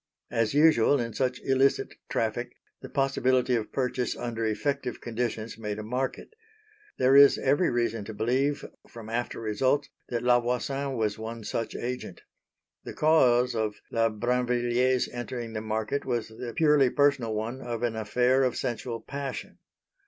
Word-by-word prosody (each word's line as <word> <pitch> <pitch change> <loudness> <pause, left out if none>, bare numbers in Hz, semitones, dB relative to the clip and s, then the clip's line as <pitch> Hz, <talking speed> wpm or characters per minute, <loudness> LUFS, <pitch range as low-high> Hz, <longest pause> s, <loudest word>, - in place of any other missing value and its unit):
As 115 +3 0
usual 145 -3 +5
in 115 -2 -3
such 125 +2 -1
illicit 135 +1 +2 0.2
traffic, - - -2 0.3
the - - -9
possibility 130 -2 +1
of 110 -2 -3
purchase 125 -2 -1
under 115 -1 -3
effective 125 +3 -2
conditions 115 -1 -4
made 105 -2 -4
a 110 - -5
market. 125 - -3 0.6
There 130 +1 +4
is 140 0 +8
every 145 +7 +2
reason 115 -2 -1
to 110 - -7
believe 130 +7 0 0.2
from 115 -2 -10
after 120 +2 -3
results 115 +6 0 0.2
that 120 -1 -2
La 120 0 +5
Voisin 135 +3 -2
was 110 -1 -1
one 115 +1 -6
such 115 +2 -3
agent. 125 +1 -5 0.6
The - - -7
cause 125 -6 +4
of 110 -2 -1 0.2
La 115 0 +2
Brinvilliers 125 +2 +1
entering 120 -1 -5
the 110 - -3
market 110 +5 -2
was 120 -4 -2
the 115 +1 -7
purely 150 -4 +4
personal 135 -6 +2
one 115 +5 -4
of 120 -2 -4
an 120 -2 0
affair 125 +5 +2
of 130 -2 +1
sensual 115 0 -3
passion. 140 -1 -6
120 Hz, 150 wpm, -27 LUFS, 115-130 Hz, 0.6 s, is